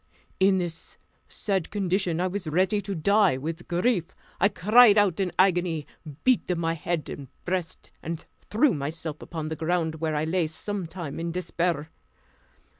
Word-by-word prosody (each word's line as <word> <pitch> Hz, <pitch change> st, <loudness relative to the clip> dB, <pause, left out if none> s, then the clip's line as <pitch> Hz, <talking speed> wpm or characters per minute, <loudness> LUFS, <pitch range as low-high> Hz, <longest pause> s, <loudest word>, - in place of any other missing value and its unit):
In 190 Hz, 0 st, +5 dB
this 175 Hz, -3 st, -5 dB, 0.3 s
sad 195 Hz, -5 st, -1 dB
condition, 190 Hz, -4 st, 0 dB
I 180 Hz, -, +1 dB
was 185 Hz, -1 st, -3 dB
ready 185 Hz, +6 st, +2 dB
to 195 Hz, 0 st, -4 dB
die 200 Hz, -1 st, +3 dB
with 165 Hz, +5 st, -5 dB
grief. 180 Hz, +1 st, +1 dB, 0.3 s
I 200 Hz, -, +5 dB
cried 215 Hz, +2 st, +6 dB
out 200 Hz, -3 st, +3 dB
in 190 Hz, -2 st, 0 dB
agony, 175 Hz, -5 st, +2 dB, 0.4 s
beat 235 Hz, -8 st, +2 dB
my 165 Hz, 0 st, 0 dB
head 165 Hz, 0 st, -3 dB
and 140 Hz, -, -7 dB, 0.2 s
breast, 180 Hz, -1 st, -3 dB
and 165 Hz, 0 st, -5 dB, 0.2 s
threw 245 Hz, +4 st, +3 dB
myself 155 Hz, +1 st, -4 dB
upon 160 Hz, -2 st, -5 dB
the 160 Hz, -, -3 dB
ground, 160 Hz, -1 st, -1 dB
where 160 Hz, -1 st, 0 dB
I 150 Hz, -, 0 dB
lay 165 Hz, +1 st, +1 dB
some 190 Hz, +3 st, -4 dB
time 165 Hz, -5 st, -6 dB
in 170 Hz, 0 st, -2 dB
despair. 170 Hz, -3 st, -1 dB
175 Hz, 160 wpm, -26 LUFS, 160-195 Hz, 0.4 s, cried